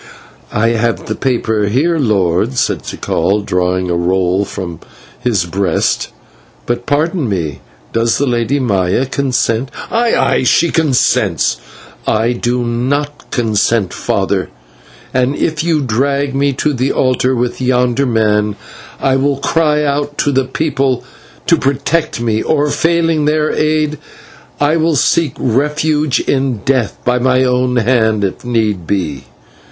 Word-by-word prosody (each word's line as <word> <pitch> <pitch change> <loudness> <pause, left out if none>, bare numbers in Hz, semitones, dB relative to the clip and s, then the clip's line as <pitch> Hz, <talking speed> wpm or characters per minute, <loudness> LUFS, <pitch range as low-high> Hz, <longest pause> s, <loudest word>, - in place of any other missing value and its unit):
"I 115 +2 +2
have 115 0 0
the - - -2
paper 110 -5 0
here, 155 +10 +1
lord," 95 - +1
said - - 0
Tikal, 100 +5 -1
drawing 90 0 0
a - - +1
roll 90 +2 +1
from 90 -4 -6 0.4
his 105 -8 0
breast; 95 +3 0 0.6
"but, 120 - -3
pardon 155 - 0
me, 80 -8 -3 0.3
does 115 0 +2
the 145 - +1
Lady 125 +2 0
Maya 100 -1 +1
consent?" 130 -2 -1 0.2
"Aye, 230 0 +2
aye, - - +2
she 165 +6 +3
consents." 140 - +1 0.5
"I 110 +2 +2
do 120 0 -1
/not/ 130 +5 -1 0.2
consent, 115 -3 +1
father, - - -1 0.6
and 130 +2 +1
if 155 0 -1
you 165 -3 +1
drag 140 +3 0
me 140 +1 +1
to 150 +3 0
the 130 +1 0
altar 130 0 +1
with 125 +1 -2
yonder 125 +1 +1
man, 105 -3 +1 0.4
I 135 -1 +2
will 140 0 +1
cry 150 +1 +1
out 145 0 -1
to 145 - +1
the 135 -1 +1
people 135 -3 -1 0.4
to - - +4
protect 140 +3 0
me, 110 -2 0
or, 150 -1 +1
failing 165 -2 +1
their 155 0 +1
aid, 155 -1 0 0.6
I 145 +3 +2
will 160 0 +1
seek 150 +2 +2
refuge 150 +3 +1
in 130 -5 -1
death 130 -5 0
by 125 0 +2
my 130 +1 +2
own 125 0 +1
hand 110 -3 +2
if 95 - -3
need 110 -8 -1
be." 75 -9 -2
125 Hz, 140 wpm, -15 LUFS, 110-145 Hz, 0.6 s, to